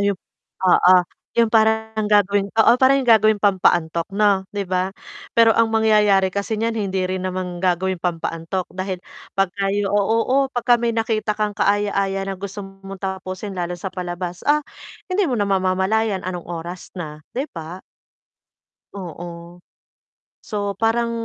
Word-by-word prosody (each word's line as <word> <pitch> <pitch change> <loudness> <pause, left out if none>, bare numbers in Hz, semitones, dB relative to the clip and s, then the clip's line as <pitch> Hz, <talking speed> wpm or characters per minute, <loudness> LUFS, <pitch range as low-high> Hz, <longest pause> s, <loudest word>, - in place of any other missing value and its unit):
yung 200 -2 0 0.5
oo, 180 0 +6 0.4
yung 230 -1 +3
parang 220 0 +2
gagawing 205 -1 +3
oo, 225 +1 +6
parang 265 +1 +6
yung 255 - -4
gagawing 215 -2 +5
pampaantok 175 -4 +2
'no, 200 -1 +2
'di 205 -1 -2
ba? 185 +1 0 0.4
Pero 230 -1 +6
ang 230 0 +4
mangyayari 210 -3 +4
kasi 200 +3 -2
niyan 225 +1 -1
hindi 190 0 -1
rin 185 0 -3
naman 185 -1 -3
gagawing 185 0 0
pampaantok 165 +1 -3
dahil 185 0 -4 0.4
'pag 195 0 +3
kayo 200 0 0
o - - +3
oo, 225 +5 +1 0.2
pagka 245 0 +3
may 235 -1 0
nakita 225 -1 0
kang 210 -1 -2
kaaya-aya 200 -1 +1
na 195 - -3
gusto 200 +2 -6
mong 195 0 -11
tapusin 190 +1 -5
lalo 175 0 -2
sa 185 +2 -5
palabas, 180 -1 -5
ah, 300 +1 +3 0.5
hindi 385 +2 +1
mo 255 - 0
na 205 -1 0
mamamalayan 190 +2 +1
anong 180 -2 -5
oras 175 +1 -7
na, 155 -4 -6
'di 270 +5 -3
ba? 165 +2 -8 1.1
Oo. 175 -2 -8 0.8
So 205 -2 -4
parang 235 +1 +1
195 Hz, 150 wpm, -21 LUFS, 185-220 Hz, 1.1 s, oo